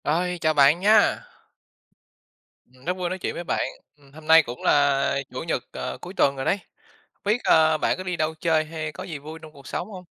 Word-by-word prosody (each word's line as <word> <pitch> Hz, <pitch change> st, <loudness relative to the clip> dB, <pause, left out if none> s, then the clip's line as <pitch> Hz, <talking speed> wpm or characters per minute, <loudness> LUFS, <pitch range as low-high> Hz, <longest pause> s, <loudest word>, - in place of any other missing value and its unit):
Rồi, 180 Hz, +3 st, 0 dB
chào 155 Hz, 0 st, +2 dB
bạn 145 Hz, +2 st, +5 dB
nha. 210 Hz, +4 st, +4 dB, 1.4 s
Ừm, 130 Hz, +1 st, -22 dB
rất 180 Hz, -, 0 dB
vui 180 Hz, -1 st, -2 dB
nói 185 Hz, -, -3 dB
chuyện -, -, -3 dB
với 175 Hz, -, -5 dB
bạn, -, -, -1 dB, 0.3 s
ừm, 140 Hz, -2 st, -22 dB
hôm 155 Hz, +1 st, -13 dB
nay 160 Hz, 0 st, +7 dB
cũng 120 Hz, -2 st, -8 dB
là 140 Hz, -1 st, +3 dB, 0.2 s
Chủ -, -, -5 dB
nhật, -, -, -2 dB
ờ, 65 Hz, 0 st, -5 dB
cuối 180 Hz, -, -8 dB
tuần 140 Hz, -8 st, +2 dB
rồi 135 Hz, -, -4 dB
đấy. 195 Hz, -, +2 dB, 0.6 s
Hông -, -, -45 dB
biết, 215 Hz, +4 st, +1 dB
ơ, 160 Hz, -1 st, +4 dB
bạn -, -, 0 dB
có 185 Hz, -, -6 dB
đi 180 Hz, -1 st, -3 dB
đâu 155 Hz, 0 st, 0 dB
chơi 160 Hz, -2 st, +1 dB
hay 155 Hz, -1 st, -5 dB
có 140 Hz, -, -8 dB
gì 160 Hz, -5 st, -7 dB
vui 155 Hz, +3 st, -9 dB
trong 155 Hz, -1 st, -12 dB
cuộc 140 Hz, -3 st, -15 dB
sống 180 Hz, -, -4 dB
hông? 185 Hz, -2 st, -9 dB
155 Hz, 230 wpm, -24 LUFS, 145-175 Hz, 1.4 s, nay